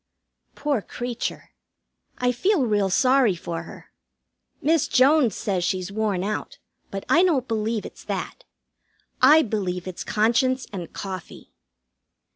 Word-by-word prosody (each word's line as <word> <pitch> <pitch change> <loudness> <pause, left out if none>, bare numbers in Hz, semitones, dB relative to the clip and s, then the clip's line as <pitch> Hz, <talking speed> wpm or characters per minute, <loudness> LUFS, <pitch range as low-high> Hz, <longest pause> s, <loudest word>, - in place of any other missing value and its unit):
Poor 285 -6 -1
creature, 240 +3 -5 0.7
I 250 0 +1
feel 310 - +1
real 205 -3 +1
sorry 255 0 +3
for 170 -1 -5
her. - - -13 0.7
Miss 320 0 +2
Jones 265 - +4
says 190 -4 -1
she's 185 +2 -2
worn 205 -3 -1
out, 210 +1 -4 0.3
but 195 0 -6
I 340 - +5
don't 300 -9 +2
believe 220 -1 -1
it's - - -11
that. - - -5 0.8
I 315 +1 +7
believe 185 -5 -3
it's 185 - -5
conscience 255 +4 +1
and 180 -4 -6
coffee. 190 -3 -8
220 Hz, 125 wpm, -24 LUFS, 195-260 Hz, 0.8 s, I